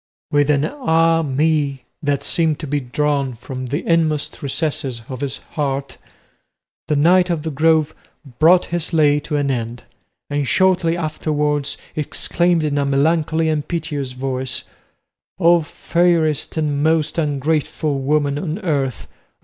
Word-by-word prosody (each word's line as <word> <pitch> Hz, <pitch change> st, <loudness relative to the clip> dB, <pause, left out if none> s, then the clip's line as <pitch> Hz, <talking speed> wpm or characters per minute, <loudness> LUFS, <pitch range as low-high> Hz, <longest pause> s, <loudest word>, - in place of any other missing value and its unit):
With 145 Hz, 0 st, +3 dB
an 145 Hz, 0 st, +3 dB
"Ah 165 Hz, -, +2 dB
me!" 145 Hz, -2 st, 0 dB, 0.2 s
that 145 Hz, -2 st, 0 dB
seemed 160 Hz, -3 st, +1 dB
to 155 Hz, -, -6 dB
be 145 Hz, 0 st, -1 dB
drawn 140 Hz, 0 st, -1 dB
from 125 Hz, +2 st, -7 dB
the 145 Hz, +6 st, -3 dB
inmost 160 Hz, -3 st, +1 dB
recesses 140 Hz, -4 st, -2 dB
of 130 Hz, 0 st, -6 dB
his 140 Hz, -1 st, -3 dB
heart, 140 Hz, -3 st, -3 dB, 0.9 s
the 150 Hz, -, +1 dB
Knight 180 Hz, +5 st, +4 dB
of 165 Hz, -3 st, -1 dB
the 160 Hz, -, -3 dB
Grove 155 Hz, +1 st, +2 dB, 0.5 s
brought 175 Hz, +4 st, +6 dB
his 175 Hz, 0 st, -1 dB
lay 150 Hz, -2 st, +4 dB
to 150 Hz, +1 st, -4 dB
an 145 Hz, -1 st, +1 dB
end, 120 Hz, -1 st, -4 dB, 0.4 s
and 145 Hz, -1 st, -1 dB
shortly 180 Hz, -2 st, +2 dB
afterwards 150 Hz, -3 st, -1 dB, 0.2 s
exclaimed 170 Hz, +2 st, 0 dB
in 145 Hz, -1 st, 0 dB
a -, -, +2 dB
melancholy 160 Hz, +3 st, +1 dB
and 155 Hz, -2 st, -1 dB
piteous 150 Hz, -6 st, -3 dB
voice, 130 Hz, -1 st, -2 dB, 0.7 s
"O 170 Hz, -1 st, +5 dB
fairest 165 Hz, -1 st, 0 dB
and 145 Hz, -2 st, 0 dB
most 160 Hz, +1 st, +1 dB
ungrateful 150 Hz, 0 st, -1 dB
woman 145 Hz, +1 st, +1 dB
on 160 Hz, +1 st, -3 dB
earth! 135 Hz, -, -1 dB
150 Hz, 140 wpm, -20 LUFS, 140-160 Hz, 0.9 s, brought